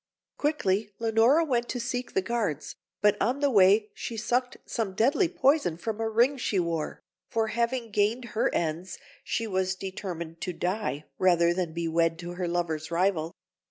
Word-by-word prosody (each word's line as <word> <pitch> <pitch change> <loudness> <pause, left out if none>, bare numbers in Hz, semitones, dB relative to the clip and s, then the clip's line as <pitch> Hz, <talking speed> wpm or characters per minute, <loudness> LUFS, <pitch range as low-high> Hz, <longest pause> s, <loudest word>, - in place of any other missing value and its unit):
Quickly 210 -9 0
Leonora 230 +8 +4
went 240 -5 0
to 250 - -2
seek 245 +1 -3
the 190 - +2
guards, 205 - -2 0.3
but 210 -1 +5
on 245 +6 +1
the 285 -1 +2
way 205 0 +5
she 230 - -6
sucked 245 +4 0
some 215 -5 -3
deadly 280 - +3
poison 275 - +2
from 220 +5 -4
a 225 - 0
ring 240 +6 +3
she 210 -6 0
wore, 165 -3 -2 0.3
for 225 -3 0
having 235 0 -1
gained 215 +4 +1
her 220 - +1
ends, 170 +2 -2 0.3
she 230 - -2
was 190 -2 0
determined 175 -4 -6
to 180 - -3
die 175 -5 -2
rather 170 -2 +4
than 175 -2 -2
be 170 +1 -3
wed 165 0 +2
to 175 0 -6
her 175 0 -3
lover's 165 -3 -2
rival. 170 -2 0
205 Hz, 170 wpm, -28 LUFS, 175-235 Hz, 0.3 s, but